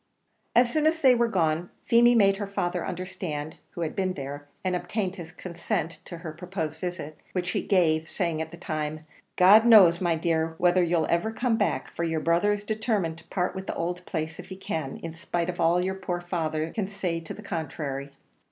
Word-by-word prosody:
As 240 0 +5
soon 310 0 +3
as 320 +1 +2
they 265 -5 +6
were 235 -1 +3
gone, 170 -4 0 0.2
Feemy 240 +1 +6
made 195 -3 +5
her 205 -1 -3
father 180 -3 -2
understand 180 -5 -5 0.2
who 170 - -4
had 160 - -2
been 190 -1 0
there, 145 -1 -7 0.2
and 185 -1 0
obtained 190 +1 -2
his 165 -2 -8
consent 170 -2 -3
to 175 - -7
her 160 - -3
proposed 160 -2 -5
visit, 175 -4 -5
which 180 -1 -1
he - - 0
gave, 160 -4 +2
saying 170 -5 -1
at 160 - -4
the 170 - -11
time, 155 -2 -4 0.3
"God 200 +5 +8
knows, 195 -8 +7
my 170 -2 +2
dear, 160 0 0
whether 175 +1 +4
you'll 170 -2 +2
ever 170 +6 +1
come 235 +1 +1
back, 145 -11 -1
for 170 - -3
your 160 -1 0
brother's 190 +6 +2
determined 210 -6 -1
to - - -19
part 180 -2 -1
with 190 0 -6
the - - -3
owld 175 +1 -2
place 160 -1 -3
if - - -8
he 190 - -7
can, 160 -7 -4
in 165 -1 -5
spite 170 +1 -2
of 175 - -13
all 175 +2 +3
your 190 - -1
poor 180 -2 -3
father 160 -3 -2
can 210 -4 -2
say 190 -4 -2
to 165 - -7
the 215 - -11
contrary." 145 -5 -4
175 Hz, 205 wpm, -27 LUFS, 160-195 Hz, 0.3 s, God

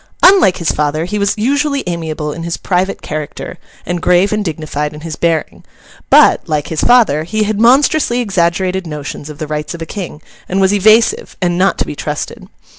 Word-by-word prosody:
Unlike 370 - +6
his 170 -4 0
father, 150 +2 -1
he 210 +4 -3
was 200 0 +1
usually 280 +5 0
amiable 160 -3 -3
in 165 - -7
his 170 0 -3
private 185 +1 -1
character, 150 -1 -6 0.3
and 175 -1 -3
grave 180 +4 +3
and 210 0 -1
dignified 150 -3 -4
in 150 - -10
his 160 -1 -6
bearing; 165 -2 -1 0.5
but, - - +5
like 150 -2 -1
his 160 - -2
father, 230 - +4
he 215 +6 -1
had 210 0 -2
monstrously 260 +1 +3
exaggerated 185 -3 0
notions 150 -1 -7
of 150 - -9
the 155 - -4
rights 150 +2 -4
of 170 - -10
a - - -6
king, 175 -4 -7 0.3
and 190 - 0
was 190 +1 +3
evasive, 215 +3 +3
and 175 -2 0
not 185 +2 +2
to - - -1
be - - -6
trusted. 150 +1 -5
175 Hz, 190 wpm, -15 LUFS, 155-210 Hz, 0.5 s, Unlike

